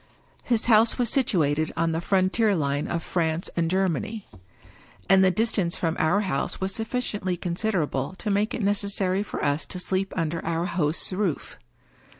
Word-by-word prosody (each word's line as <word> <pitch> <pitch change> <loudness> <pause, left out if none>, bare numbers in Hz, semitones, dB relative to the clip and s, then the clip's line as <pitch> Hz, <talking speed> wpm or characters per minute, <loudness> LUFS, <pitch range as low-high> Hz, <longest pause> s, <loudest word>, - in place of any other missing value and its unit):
His 235 -3 +1
house 225 -1 +4
was 240 -3 +1
situated 155 - +1
on 165 0 +1
the 165 +1 -2
frontier 195 +3 +2
line 145 -2 -1
of 170 -1 -3
France 165 -1 -1
and 165 -1 0
Germany; 190 +3 -1 0.8
and 190 0 +5
the 190 - +5
distance 195 -3 +1
from 165 -1 -1
our 175 +6 +2
house 185 -9 -2
was 190 +1 -1
suf 225 +1 -3
ficiently 205 -8 -2
considerable 175 -6 -1
to 210 - -3
make 205 +2 +1
it 230 - -3
necessary 200 -1 +1
for 205 - -4
us 145 +1 0
to - - -5
sleep 190 +1 -1
under 165 -1 -2
our 165 +1 -1
host's 170 -1 -1
roof. 185 -5 -2
185 Hz, 165 wpm, -25 LUFS, 165-205 Hz, 0.8 s, and